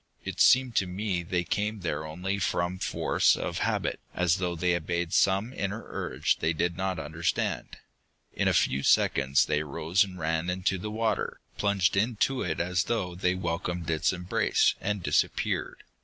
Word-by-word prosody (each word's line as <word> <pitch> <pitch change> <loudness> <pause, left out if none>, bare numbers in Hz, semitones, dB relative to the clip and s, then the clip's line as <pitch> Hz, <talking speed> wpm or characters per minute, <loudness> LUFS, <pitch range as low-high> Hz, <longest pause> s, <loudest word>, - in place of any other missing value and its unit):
It - - -3
seemed 130 -2 +5
to 95 - +2
me 95 0 -2
they 90 +1 -1
came 105 +3 -2
there 80 -2 -3
only 95 +5 -3
from 90 0 -1
force - - +2
of - - -3
habit, - - -1 0.2
as 90 0 +2
though 90 -2 -2
they 90 +1 +1
obeyed 85 0 -2
some 100 +6 +2
inner 100 0 -3
urge - - -1
they 80 +1 +1
did 85 +2 -1
not 95 0 -2
understand. 80 +3 -2 0.6
In - - 0
a - - +3
few 70 - +2
seconds 70 0 +3
they 75 - 0
rose 80 +6 +1
and 95 -2 -8
ran 80 +1 -1
into 95 +1 0
the 105 - -5
water, 110 +1 -1 0.2
plunged 100 -2 +2
into 115 +5 +1
it 80 -3 -2
as 90 0 0
though 95 -7 -1
they 90 +1 0
welcomed 85 -1 -3
its 80 -2 +2
embrace, 90 -1 +1
and 105 -2 -2
disappeared. - - 0
90 Hz, 170 wpm, -28 LUFS, 85-100 Hz, 0.6 s, seemed